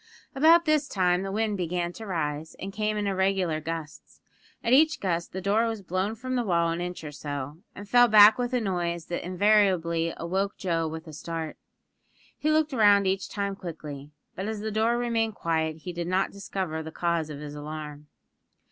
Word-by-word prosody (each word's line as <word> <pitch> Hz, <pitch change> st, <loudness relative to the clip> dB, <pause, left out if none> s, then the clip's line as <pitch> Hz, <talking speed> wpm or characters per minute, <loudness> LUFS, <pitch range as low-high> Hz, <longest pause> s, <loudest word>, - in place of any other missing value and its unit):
About 325 Hz, +4 st, +5 dB
this 305 Hz, -2 st, +2 dB
time 180 Hz, -2 st, +1 dB
the 195 Hz, 0 st, -4 dB
wind 215 Hz, 0 st, 0 dB
began 175 Hz, 0 st, -2 dB
to 220 Hz, +2 st, -9 dB
rise, 160 Hz, -3 st, -3 dB
and 195 Hz, +1 st, -7 dB
came 215 Hz, +1 st, -1 dB
in 205 Hz, -, -1 dB
irregular 190 Hz, -4 st, 0 dB
gusts. 160 Hz, -1 st, -7 dB, 0.4 s
At 230 Hz, -, +2 dB
each 315 Hz, +4 st, +5 dB
gust 170 Hz, -3 st, -2 dB
the 190 Hz, -, -5 dB
door 210 Hz, +5 st, +2 dB
was 225 Hz, -3 st, -4 dB
blown 185 Hz, +4 st, -1 dB
from 255 Hz, +3 st, -4 dB
the 245 Hz, -, +1 dB
wall 170 Hz, -5 st, +2 dB
an 170 Hz, +1 st, -3 dB
inch 180 Hz, -1 st, -5 dB
or 150 Hz, -, -6 dB
so, 145 Hz, 0 st, -6 dB, 0.2 s
and 205 Hz, +1 st, -9 dB
fell 245 Hz, +3 st, +6 dB
back 215 Hz, 0 st, +8 dB
with 245 Hz, 0 st, -1 dB
a 250 Hz, -, +3 dB
noise 175 Hz, -5 st, -2 dB
that 175 Hz, -, -3 dB
invariably 180 Hz, -3 st, +2 dB
awoke 190 Hz, +4 st, -2 dB
Joe 165 Hz, -3 st, -1 dB
with 160 Hz, +1 st, -6 dB
a 155 Hz, -, -10 dB
start. 160 Hz, 0 st, -5 dB, 0.8 s
He 305 Hz, -, -1 dB
looked 310 Hz, -1 st, +2 dB
round 205 Hz, -4 st, +5 dB
each 190 Hz, 0 st, -1 dB
time 200 Hz, -2 st, -2 dB
quickly; 150 Hz, -6 st, -8 dB, 0.3 s
but 190 Hz, +2 st, -4 dB
as 220 Hz, -1 st, -4 dB
the 220 Hz, 0 st, -3 dB
door 225 Hz, +3 st, +2 dB
remained 230 Hz, -3 st, 0 dB
quiet 160 Hz, -1 st, -1 dB
he 180 Hz, -, -5 dB
did 170 Hz, 0 st, -4 dB
not 185 Hz, +2 st, +1 dB
discover 190 Hz, -5 st, -4 dB
the 160 Hz, 0 st, -7 dB
cause 170 Hz, -2 st, -1 dB
of 145 Hz, -2 st, -7 dB
his 145 Hz, -1 st, -7 dB
alarm. 150 Hz, 0 st, -7 dB
185 Hz, 195 wpm, -27 LUFS, 165-215 Hz, 0.8 s, back